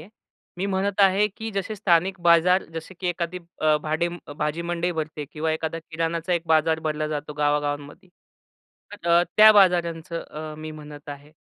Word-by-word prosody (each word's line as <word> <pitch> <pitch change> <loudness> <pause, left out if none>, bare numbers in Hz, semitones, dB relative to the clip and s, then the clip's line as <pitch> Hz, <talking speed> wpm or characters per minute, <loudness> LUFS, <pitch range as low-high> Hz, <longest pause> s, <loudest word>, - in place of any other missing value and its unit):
आहे. 160 - -13 0.5
मी 190 - -2
म्हणत 195 +1 -1
आहे, 195 +1 +5
की 225 -1 -5
जसे 200 +2 -3
स्थानिक 185 -1 +2
बाजार, 175 +2 +4
जसे 165 +3 -7
की 180 - -1
एखादी 175 0 -3 0.2
अ, 155 -1 +4
भाडे 160 +3 0 0.3
भाजीमंडई 170 +3 -2
भरते 155 -2 -4
किंवा 160 +1 -1
एखादा 160 +1 -3
किराणाचा 165 +2 -3
एक 170 - +1
बाजार 160 0 +3
भरला 155 -1 -2
जातो 150 0 -4
गावागावांमध्ये. 145 +2 -2 0.8
तर 175 -4 -6
अ, 170 +1 +6
त्या 215 0 +9
बाजारांचं 170 -4 +1
मी 155 0 -7
अ, - - -8
म्हणत 150 -1 -11
आहे, 145 +1 -9
165 Hz, 165 wpm, -24 LUFS, 155-180 Hz, 0.8 s, त्या